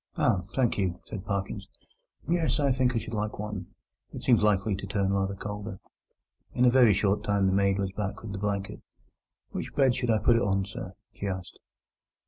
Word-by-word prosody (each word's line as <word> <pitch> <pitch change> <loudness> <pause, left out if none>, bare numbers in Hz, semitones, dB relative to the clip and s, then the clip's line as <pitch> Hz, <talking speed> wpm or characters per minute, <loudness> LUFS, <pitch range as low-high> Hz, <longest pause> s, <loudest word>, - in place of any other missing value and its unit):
"Ah! 90 -2 +2
thank 125 -5 +2
you," 90 -2 0
said 100 -4 -6
Parkins. 100 -1 -3 0.6
"Yes, 160 -3 +1
I 140 -2 +3
think 125 -1 +2
I - - +2
should 115 0 -4
like 105 0 -2
one. 105 -3 -5 0.4
It - - -8
seems 120 -3 +4
likely 105 -1 +2
to 100 - -6
turn 100 -1 0
rather 100 0 0
colder." 105 0 -6 0.8
In 125 - +4
a 125 - +6
very 120 -5 +6
short 105 +2 +1
time 100 -3 +2
the 95 - +3
maid 100 0 +3
was 95 -1 -1
back 100 +1 -4
with 110 - -6
the 100 - -4
blanket. 100 0 -2 0.7
"Which - - -5
bed 135 -3 +4
should 125 -1 -2
I 110 - +4
put 115 +2 +4
it - - +2
on, 95 -1 +1
sir?" 95 -2 -7 0.2
she 100 - -5
asked. 95 -2 -5
105 Hz, 200 wpm, -28 LUFS, 95-115 Hz, 0.8 s, a